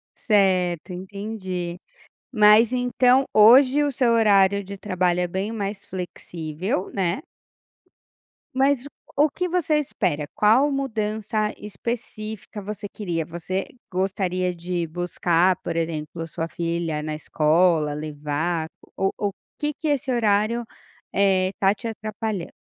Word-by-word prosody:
Certo, 185 Hz, -5 st, +2 dB
entendi. 185 Hz, -2 st, -5 dB, 0.5 s
Mas 215 Hz, +2 st, +6 dB
então, 250 Hz, +1 st, +3 dB
hoje 255 Hz, +6 st, +7 dB
o 285 Hz, -, 0 dB
seu 245 Hz, -2 st, +2 dB
horário 200 Hz, -3 st, +4 dB
de 200 Hz, +1 st, -7 dB
trabalho 180 Hz, -3 st, 0 dB
é 180 Hz, -, +1 dB
bem 190 Hz, +5 st, -3 dB
mais 200 Hz, -2 st, -4 dB
flexível, 180 Hz, 0 st, -4 dB
né. 190 Hz, -, 0 dB, 1.3 s
Mas 270 Hz, 0 st, +2 dB, 0.3 s
o 295 Hz, +2 st, +4 dB
que 360 Hz, +5 st, -2 dB
você 335 Hz, -3 st, +1 dB
espera, 150 Hz, -, -1 dB
qual 240 Hz, +8 st, +4 dB
mudança 215 Hz, -5 st, -1 dB
específica 215 Hz, 0 st, -6 dB
você 210 Hz, +1 st, -6 dB
queria? 175 Hz, -6 st, -3 dB
Você 175 Hz, +4 st, -3 dB, 0.3 s
gostaria 185 Hz, -1 st, -1 dB
de 175 Hz, 0 st, -3 dB
buscar, 175 Hz, +1 st, +1 dB
por 170 Hz, -, -5 dB
exemplo, 165 Hz, 0 st, -3 dB
sua 165 Hz, 0 st, -4 dB
filha 170 Hz, -2 st, -2 dB
na 155 Hz, 0 st, -3 dB
escola, 155 Hz, 0 st, +2 dB
levar, 155 Hz, +2 st, -2 dB, 0.3 s
o 195 Hz, 0 st, +1 dB
ou 205 Hz, -2 st, -1 dB, 0.3 s
que 295 Hz, 0 st, -1 dB
que 315 Hz, -, -5 dB
esse 285 Hz, -2 st, 0 dB
horário, 225 Hz, 0 st, +2 dB, 0.5 s
eh, 190 Hz, -2 st, +3 dB
está 195 Hz, +1 st, +2 dB
te 230 Hz, +3 st, -7 dB
atrapalhando? 215 Hz, -3 st, -4 dB
195 Hz, 120 wpm, -24 LUFS, 175-220 Hz, 1.3 s, hoje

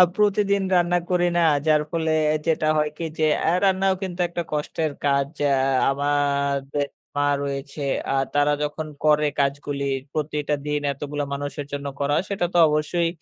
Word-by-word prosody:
আ -, -, +11 dB
প্রতিদিন 200 Hz, -1 st, +2 dB
রান্না 175 Hz, 0 st, +3 dB
করি 175 Hz, -1 st, +3 dB
না। 175 Hz, -, +4 dB, 0.3 s
যার 155 Hz, -1 st, +4 dB
ফলে 160 Hz, -1 st, -1 dB, 0.4 s
যেটা 160 Hz, -1 st, +1 dB
হয় 150 Hz, 0 st, +2 dB
কি 170 Hz, -, -4 dB
যে, 155 Hz, -, +2 dB, 0.2 s
আ -, -, +4 dB
রান্নাও 190 Hz, 0 st, +3 dB
কিন্তু 180 Hz, -1 st, -4 dB
একটা 170 Hz, 0 st, -3 dB
কষ্টের 150 Hz, +1 st, -2 dB
কাজ। 140 Hz, -1 st, +2 dB, 0.2 s
আ -, -, +4 dB, 0.4 s
আমারদের 140 Hz, 0 st, 0 dB, 0.3 s
মা 145 Hz, 0 st, +2 dB
রয়েছে। 140 Hz, +1 st, -5 dB, 0.3 s
আ -, -, +1 dB, 0.2 s
তারা 145 Hz, 0 st, +3 dB
যখন 150 Hz, +1 st, -3 dB, 0.2 s
করে 150 Hz, 0 st, +4 dB
কাজগুলি 140 Hz, 0 st, -1 dB, 0.3 s
প্রতিটা 150 Hz, -1 st, -1 dB
দিন 150 Hz, 0 st, 0 dB
এতগুলো 145 Hz, +1 st, -4 dB
মানুষের 145 Hz, 0 st, -4 dB
জন্য 145 Hz, 0 st, -4 dB
করা 140 Hz, +1 st, +1 dB
হয় 180 Hz, -, 0 dB
সেটা 190 Hz, -3 st, 0 dB
তো 175 Hz, -, +4 dB
অবশ্যই 155 Hz, +3 st, 0 dB
150 Hz, 165 wpm, -23 LUFS, 145-170 Hz, 0.4 s, আ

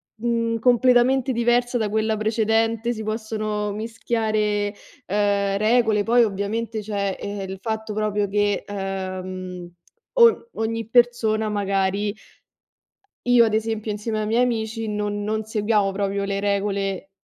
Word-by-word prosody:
mhmm, 230 Hz, 0 st, -1 dB
completamente 250 Hz, +2 st, +4 dB
diversa 240 Hz, +1 st, +2 dB
da 220 Hz, -3 st, -1 dB
quella 220 Hz, +1 st, 0 dB
precedente, 225 Hz, +2 st, +1 dB
si 220 Hz, -1 st, -6 dB
possono 215 Hz, -1 st, -3 dB
mischiare 215 Hz, -2 st, -1 dB, 0.3 s
ehm 200 Hz, 0 st, +1 dB
regole, 220 Hz, -1 st, +3 dB
poi 235 Hz, +3 st, +4 dB
ovviamente, 215 Hz, +2 st, -2 dB
cioè 200 Hz, -2 st, -2 dB
ehm, 205 Hz, 0 st, -5 dB
il 190 Hz, -, -5 dB
fatto 220 Hz, +1 st, -4 dB
proprio 210 Hz, -1 st, 0 dB
che 205 Hz, 0 st, +1 dB
ehm 185 Hz, -2 st, -5 dB, 0.5 s
o 470 Hz, -1 st, +5 dB
ogni 225 Hz, 0 st, -2 dB
persona 230 Hz, -3 st, +3 dB
magari 200 Hz, 0 st, 0 dB, 1.1 s
Io 245 Hz, -1 st, +6 dB
ad 220 Hz, -2 st, +1 dB
esempio 220 Hz, 0 st, -1 dB
insieme 215 Hz, +1 st, -3 dB
ai -, -, -2 dB
miei 230 Hz, +3 st, +2 dB
amici 225 Hz, -2 st, -2 dB
non 210 Hz, -1 st, -2 dB
non 215 Hz, +1 st, -1 dB
seguiamo 210 Hz, -2 st, +1 dB
proprio 200 Hz, 0 st, -1 dB
le 200 Hz, 0 st, -2 dB
regole 200 Hz, -1 st, -1 dB
215 Hz, 130 wpm, -23 LUFS, 205-225 Hz, 1.1 s, Io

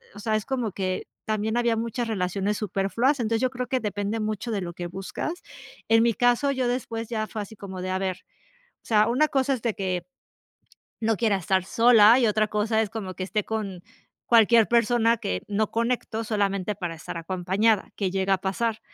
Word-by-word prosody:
o -, -, -9 dB
sea, 215 Hz, +1 st, 0 dB
es 215 Hz, -, -5 dB
como 245 Hz, -6 st, -2 dB
que 185 Hz, -1 st, -3 dB, 0.2 s
también 215 Hz, +1 st, -1 dB
había 235 Hz, -1 st, +2 dB
muchas 230 Hz, +1 st, -2 dB
relaciones 200 Hz, 0 st, -1 dB
superfluas. 215 Hz, -, 0 dB
Entonces, 225 Hz, 0 st, 0 dB
yo 255 Hz, -, +2 dB
creo 250 Hz, -1 st, -4 dB
que 260 Hz, 0 st, -1 dB
depende 205 Hz, +1 st, -2 dB
mucho 215 Hz, +2 st, -3 dB
de 205 Hz, -3 st, -1 dB
lo 175 Hz, -1 st, -4 dB
que 175 Hz, 0 st, -6 dB
buscas. 195 Hz, -, -4 dB, 0.6 s
En 225 Hz, 0 st, +6 dB
mi 235 Hz, -, +3 dB
caso, 245 Hz, +6 st, +2 dB
yo 260 Hz, -3 st, 0 dB
después 230 Hz, -2 st, -3 dB
ya 215 Hz, -2 st, -2 dB
fue 215 Hz, -, -5 dB
así 205 Hz, +2 st, -9 dB
como 190 Hz, -2 st, -7 dB
de, 185 Hz, -, -4 dB
a 185 Hz, -, 0 dB
ver, 190 Hz, -1 st, -2 dB, 0.7 s
o -, -, -20 dB
sea, 215 Hz, 0 st, +4 dB
una 260 Hz, +6 st, +3 dB
cosa 275 Hz, -2 st, +1 dB
es 245 Hz, -, -6 dB
de 230 Hz, -3 st, 0 dB
que 185 Hz, -2 st, -3 dB, 1.0 s
no 225 Hz, 0 st, +2 dB
quiera 215 Hz, -2 st, +2 dB
estar 190 Hz, 0 st, 0 dB
sola, 230 Hz, +2 st, +6 dB
y 240 Hz, -, +3 dB
otra 215 Hz, 0 st, +2 dB
cosa 215 Hz, +1 st, +1 dB
es 215 Hz, -, -3 dB
como 195 Hz, -5 st, -5 dB
que 185 Hz, -, -6 dB
esté 205 Hz, +3 st, -1 dB
con 200 Hz, -5 st, -4 dB, 0.4 s
cualquier 230 Hz, -1 st, +5 dB
persona 235 Hz, 0 st, +3 dB
que 90 Hz, -, -3 dB
no 210 Hz, +1 st, 0 dB
conecto 230 Hz, -1 st, -1 dB
solamente 205 Hz, -2 st, -1 dB
para 175 Hz, -4 st, -4 dB
estar 165 Hz, -, -8 dB
acompañada, 190 Hz, +5 st, +1 dB
que 195 Hz, -3 st, -1 dB
llega 195 Hz, +1 st, +1 dB
a -, -, -1 dB
pasar. 220 Hz, +3 st, -1 dB
215 Hz, 205 wpm, -25 LUFS, 195-230 Hz, 1.0 s, En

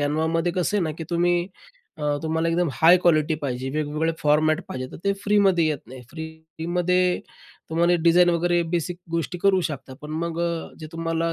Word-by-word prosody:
Canvaमध्ये 160 Hz, +4 st, 0 dB
कसं 185 Hz, +3 st, 0 dB
आहे 195 Hz, -, +1 dB
ना? 155 Hz, -, -1 dB
की 165 Hz, -, -4 dB
तुम्ही 175 Hz, +1 st, +1 dB, 0.5 s
अ, 155 Hz, -, -9 dB, 0.2 s
तुम्हाला 160 Hz, +1 st, 0 dB
एकदम 170 Hz, 0 st, +1 dB
हाय 170 Hz, +5 st, +6 dB
क्वालिटी 155 Hz, -2 st, +3 dB
पाहिजे, 130 Hz, -1 st, -3 dB
वेगवेगळे 155 Hz, +2 st, -1 dB
फॉर्मॅट 155 Hz, +3 st, +2 dB
पाहिजे, 130 Hz, -9 st, -4 dB
तर -, -, -7 dB
ते 200 Hz, -, +3 dB
फ्रीमध्ये 195 Hz, -5 st, +3 dB
येत 150 Hz, -3 st, 0 dB
नाही. 130 Hz, +2 st, -10 dB
फ्रीमध्ये 170 Hz, +3 st, -1 dB, 0.5 s
तुम्हाला 170 Hz, +2 st, +3 dB
डिझाईन 175 Hz, +1 st, +5 dB
वगैरे 175 Hz, 0 st, +2 dB
बेसिक 175 Hz, 0 st, -1 dB
गोष्टी 170 Hz, +1 st, -2 dB
करू 190 Hz, 0 st, +3 dB
शकता. 135 Hz, -3 st, -7 dB
पण 150 Hz, 0 st, -9 dB
मग 170 Hz, 0 st, -4 dB
अ, 170 Hz, -1 st, -2 dB
जे 155 Hz, -, -7 dB
तुम्हाला 165 Hz, 0 st, -1 dB
165 Hz, 175 wpm, -24 LUFS, 155-175 Hz, 0.5 s, हाय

